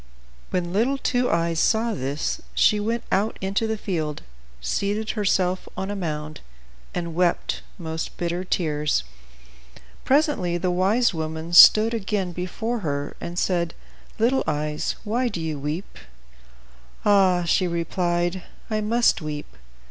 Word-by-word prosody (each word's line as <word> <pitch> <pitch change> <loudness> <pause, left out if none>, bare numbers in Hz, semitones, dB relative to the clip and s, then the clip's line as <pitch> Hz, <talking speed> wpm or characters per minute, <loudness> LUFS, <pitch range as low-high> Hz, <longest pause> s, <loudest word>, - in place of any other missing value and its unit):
When 175 -1 -2
little 245 +7 +2
Two 250 -2 0
Eyes 165 -1 +1
saw 225 +4 +2
this, 140 -4 -2
she 210 - +4
went 225 +3 -1
out 205 +4 +1
into 195 +4 -1
the 220 0 -1
field, 160 -7 -3 0.4
seated 200 - -1
herself 185 -4 0
on 190 +1 -3
a - - -3
mound, 155 -5 -4 0.5
and 170 -2 -4
wept 175 0 0 0.2
most 160 -2 -5
bitter 175 +1 -2
tears. 150 - 0 1.0
Presently 270 - +2
the 180 +1 0
wise 200 +6 +2
woman 160 +1 -4
stood 215 +6 +9
again 200 -4 -1
before 205 +7 -3
her, 145 -5 -3
and 175 +1 -6
said, 175 -3 0 0.4
"Little 250 +4 +2
Two - - -2
Eyes, 150 0 -2
why 235 +4 0
do 205 -7 -4
you 160 -3 -3
weep?" 150 - -5 1.1
"Ah!" 190 -3 +4
she 180 +2 +2
replied, 175 +1 -1 0.3
"I 215 0 0
must 235 0 +2
weep. 150 -1 -6
180 Hz, 135 wpm, -24 LUFS, 165-215 Hz, 1.1 s, stood